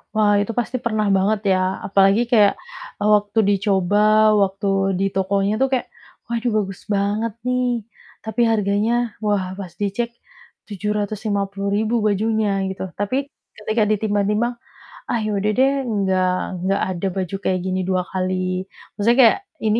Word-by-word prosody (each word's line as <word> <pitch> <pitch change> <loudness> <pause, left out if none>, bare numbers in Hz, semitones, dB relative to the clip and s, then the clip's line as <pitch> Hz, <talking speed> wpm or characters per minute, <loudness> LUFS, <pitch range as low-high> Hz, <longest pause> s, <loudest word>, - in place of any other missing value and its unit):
Wah, 210 -1 +4
itu 205 - -4
pasti 240 +1 -3
pernah 215 -2 0
banget 205 +3 +1 0.2
ya, - - +1 0.3
apalagi 195 +2 +4
kayak, 210 -4 +5 0.5
eee, 210 0 +1
waktu 205 +1 0
dicoba, 195 -1 +1 0.4
waktu 195 +1 -2 0.3
di 195 - +1
tokonya 195 +1 +1
tuh 270 - +4
kayak, 260 -2 0 0.4
waduh 235 0 -1
bagus 195 -3 -3
banget 205 +3 0 0.2
nih, 250 -3 0 0.4
tapi 220 +2 -2
harganya, 205 +1 +1 0.3
wah 205 -3 +1
pas 185 -3 -7
dicek 205 +4 -1 0.6
Rp750.000 205 0 -2
bajunya, 215 +1 +1 0.2
gitu. 190 - -5 0.2
Tapi 260 +7 -1 0.3
ketika 215 +1 0
ditimbang-timbang, 210 +2 0 0.6
"Ah 235 - 0
ya 215 - -1
udah 210 +2 +1
deh 265 +1 +4 0.2
enggak 190 -3 +1 0.3
enggak 195 +3 0
ada 185 +1 -2
baju 190 -1 -3
kayak 185 -1 +1
gini 185 0 -1
2 185 -1 +1
kali" 185 0 -2 0.3
maksudnya 230 +4 +2
kayak 225 - +6 0.3
ini 215 +1 +2
205 Hz, 140 wpm, -21 LUFS, 195-220 Hz, 0.6 s, kayak